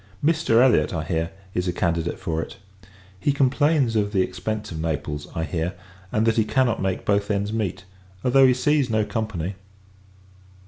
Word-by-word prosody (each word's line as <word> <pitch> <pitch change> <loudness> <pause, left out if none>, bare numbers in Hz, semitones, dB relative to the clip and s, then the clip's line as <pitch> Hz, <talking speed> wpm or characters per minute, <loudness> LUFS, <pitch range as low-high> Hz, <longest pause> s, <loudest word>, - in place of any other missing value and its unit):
Mr. 155 -8 +3
Elliot, 90 - +3
I 80 - -2
hear, 80 +1 -1 0.2
is 90 +1 -1
a - - +2
candidate 85 -1 -1
for 80 -1 -2
it. - - -8 0.6
He 145 - +2
complains 140 -2 +2
of 105 -1 +1
the 95 -2 +3
expence 105 +3 -4
of 80 - -5
Naples, 75 -2 -3
I 80 - -1
hear; 85 +2 -2 0.4
and, 110 +1 +1
that 115 0 +2
he 110 - +5
cannot 120 +1 +1
make 95 -1 -2
both 100 0 +1
ends 100 +1 -1
meet, 105 -4 -2 0.4
although 130 +1 +6
he 130 - +5
sees 145 0 +2
no 110 -1 +1
company. 100 -4 -3
105 Hz, 175 wpm, -24 LUFS, 85-120 Hz, 0.6 s, although